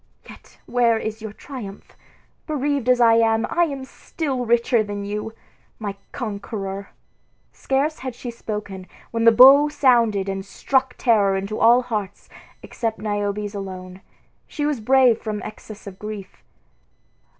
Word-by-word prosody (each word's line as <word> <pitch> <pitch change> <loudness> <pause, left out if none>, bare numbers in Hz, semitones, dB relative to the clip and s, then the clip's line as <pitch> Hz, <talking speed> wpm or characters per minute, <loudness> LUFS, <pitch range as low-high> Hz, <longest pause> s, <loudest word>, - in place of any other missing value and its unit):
Yet - - -15
where 235 -2 +2
is 220 0 -5
your 220 -1 -6
triumph? 215 -4 -10 0.5
Bereaved 285 -4 -1
as 250 -1 +4
I 230 -1 +6
am, 225 0 +3
I 345 0 +3
am 275 -4 -5
still 265 -2 -4
richer 235 0 +3
than 205 -1 -5
you, 210 +2 -4 0.5
my 205 -3 -5 0.2
conqueror." 200 -4 -5 0.6
Scarce 280 +4 -1
had 260 -2 -6
she 245 0 -6
spoken, 210 -5 -6 0.2
when 230 0 0
the 230 - +9
bow 270 +5 +8
sounded 235 -9 +3
and 195 0 -3
struck 260 +5 -1
terror 205 -5 +3
into 200 +3 -4
all 240 +2 +5
hearts 210 -5 -5 0.3
except 225 -2 -3
Niobe's 205 0 -2
alone. 185 -2 -7 0.5
She 295 - -3
was 295 -4 0
brave 250 0 +4
from 215 -2 -3
excess 215 0 -10
of 195 -2 -10
grief. 210 -2 -8
225 Hz, 140 wpm, -22 LUFS, 205-255 Hz, 0.6 s, the